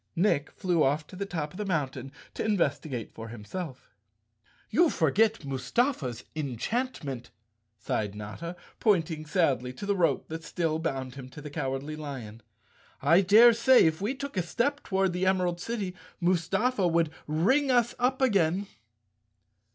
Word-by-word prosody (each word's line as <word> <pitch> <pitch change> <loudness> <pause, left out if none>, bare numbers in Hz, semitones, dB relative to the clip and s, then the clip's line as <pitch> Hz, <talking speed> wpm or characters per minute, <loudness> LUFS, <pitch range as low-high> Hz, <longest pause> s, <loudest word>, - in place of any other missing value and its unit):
Nick 165 -5 +2
flew 175 -4 0
off 145 +3 +1
to 185 - -13
the 200 +2 -4
top 155 -5 -3
of 180 - -11
the 210 - -2
mountain 135 -7 -2 0.2
to - - -3
investi¬ 170 -8 0
gate 120 -5 -5
for 115 0 -8
himself. 125 - -7 0.8
"You 345 -1 +5
forget 210 - +2
Mustafa's 135 - -1
enchantment," 145 - -3 0.5
sighed 105 0 -2
Notta, 105 - -6 0.2
pointing 165 -6 +1
sadly 135 - +1
to 165 - -7
the 200 0 +1
rope 175 -3 +1
that 160 +1 -5
still 165 -2 -1
bound 135 -6 -3
him 130 -1 -9
to 150 - -11
the 150 -1 -8
Cowardly 140 0 -3
Lion. 130 -8 -7 0.6
"I 165 +7 +5
daresay 235 +6 +7
if 160 +2 +1
we 220 +7 -1
took 280 -1 -6
a 185 - +2
step 270 - -1
toward 190 -2 0
the 180 +1 0
Emerald 180 -2 +1
City, 205 -5 -3 0.3
Mustafa 185 +5 +1
would 165 -2 +2 0.2
ring 220 - +2
us 240 -2 +3
up 260 +2 +1
again." 195 -5 +2
170 Hz, 150 wpm, -28 LUFS, 140-205 Hz, 0.8 s, daresay